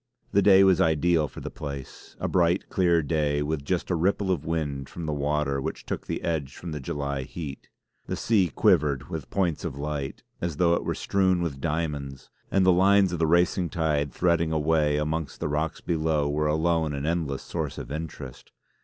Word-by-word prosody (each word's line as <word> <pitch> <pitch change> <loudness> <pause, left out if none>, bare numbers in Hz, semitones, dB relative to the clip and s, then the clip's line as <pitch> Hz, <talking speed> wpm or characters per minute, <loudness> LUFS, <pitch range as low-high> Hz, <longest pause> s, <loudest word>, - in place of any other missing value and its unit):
The 100 - +4
day 95 -1 +7
was 95 -2 +5
ideal 80 0 +3
for - - -10
the - - -6
place; 70 -3 -8
a - - -1
bright, 90 0 +2
clear 85 -3 +3
day 75 -1 0
with 75 -1 -2
just 90 +4 -1
a - - +2
ripple 95 +3 +1
of 85 -6 -1
wind 70 -5 -2
from 85 - -6
the 75 - -1
water 70 -1 0
which - - -5
took - - -5
the - - -3
edge 80 -5 -2
from 85 - -7
the 75 - -4
July 70 0 -3
heat. 70 +1 -7 0.4
The - - -2
sea 105 -5 +2
quivered 70 -2 +2
with - - -5
points 90 -5 0
of - - -4
light, 70 -1 -4 0.2
as 85 -4 -2
though 85 -1 +4
it - - 0
were - - -2
strewn 95 -3 +1
with 70 -5 -4
diamonds, 75 -4 -3 0.2
and 95 -1 +3
the 95 - +6
lines 95 0 +4
of 85 - -2
the 80 - +2
racing 85 +1 +2
tide 75 -4 0
threading 85 -2 +1
a 80 - +1
way 75 -1 +2
amongst 75 -1 -2
the - - -1
rocks 75 +2 -2
below 80 -3 0
were 75 +1 0
alone 80 0 +1
an 70 +1 -3
endless 80 -4 -1
source - - -4
of - - -7
interest. 75 -4 -7
80 Hz, 200 wpm, -26 LUFS, 75-85 Hz, 0.4 s, day